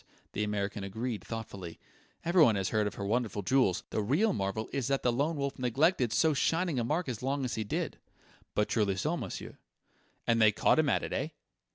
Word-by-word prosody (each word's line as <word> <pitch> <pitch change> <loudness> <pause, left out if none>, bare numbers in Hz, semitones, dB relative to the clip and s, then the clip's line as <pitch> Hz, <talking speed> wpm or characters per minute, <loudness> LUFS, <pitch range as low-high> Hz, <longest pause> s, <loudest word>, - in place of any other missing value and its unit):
the 105 - -1
American 100 -1 -2
agreed 110 +3 -4
thoughtfully. 100 -7 -7 0.5
"Everyone 165 - +5
has 95 -1 0
heard 105 -1 +1
of - - -5
her 100 - -4
wonderful 110 -1 -1
jewels. 100 -3 +2
The - - 0
real 160 - +2
marvel 100 - -2
is 135 -4 -1
that 135 0 0
the 120 - +2
Lone 145 +7 0
Wolf 140 -1 -3
neglected 130 - +2
so 160 +6 +3
shining 165 0 +1
a - - 0
mark 155 +8 -1
as 120 -4 -4
long 135 +1 -1
as 125 - -3
he 110 - -1
did." 105 - -3 0.6
"But 105 - +2
truly 105 -4 +1
so, 155 - 0
monsieur!" 115 - -6 0.7
"And 115 -1 +3
they 110 -1 +7
caught 105 - +3
him 155 -3 +3
at - - +1
it, - - -4
eh?" - - -1
120 Hz, 205 wpm, -31 LUFS, 105-140 Hz, 0.7 s, they